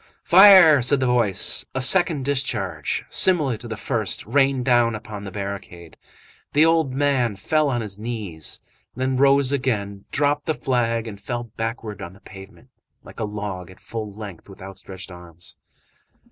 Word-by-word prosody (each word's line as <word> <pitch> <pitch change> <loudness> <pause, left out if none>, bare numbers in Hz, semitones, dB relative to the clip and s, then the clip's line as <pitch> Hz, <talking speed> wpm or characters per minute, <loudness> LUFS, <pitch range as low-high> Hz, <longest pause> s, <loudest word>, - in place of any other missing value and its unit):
"Fire!" 185 -6 +8
said 130 +3 +3
the 130 - 0
voice. 120 -6 +2
A - - 0
second 145 0 +3
discharge, 105 - -2
similar 155 -10 +2
to 120 - -10
the 110 -2 -6
first, 110 -3 -2
rained 135 +2 +1
down 120 -3 +3
upon 105 -1 -8
the 95 - -7
barricade. 100 -4 -7 0.6
The 150 +2 +5
old 160 -5 +1
man 135 -6 +1
fell 155 +9 0
on 120 -3 -1
his 105 -2 -6
knees, 105 -9 -5 0.4
then 130 +1 -1
rose 140 0 +3
again, 105 -7 -2
dropped 145 0 0
the 160 - 0
flag 115 -3 -1
and 100 -2 -9
fell 120 +3 -4
backwards 115 -2 -5
on 85 - -8
the 95 - -18
pavement, 100 +5 -14 0.3
like - - -13
a 110 - -1
log, 105 -4 -6
at 95 - -16
full 110 -2 -6
length, 100 -4 -10
with 95 - -14
outstretched 95 0 -10
arms. 85 -1 -10
115 Hz, 160 wpm, -22 LUFS, 100-135 Hz, 0.6 s, Fire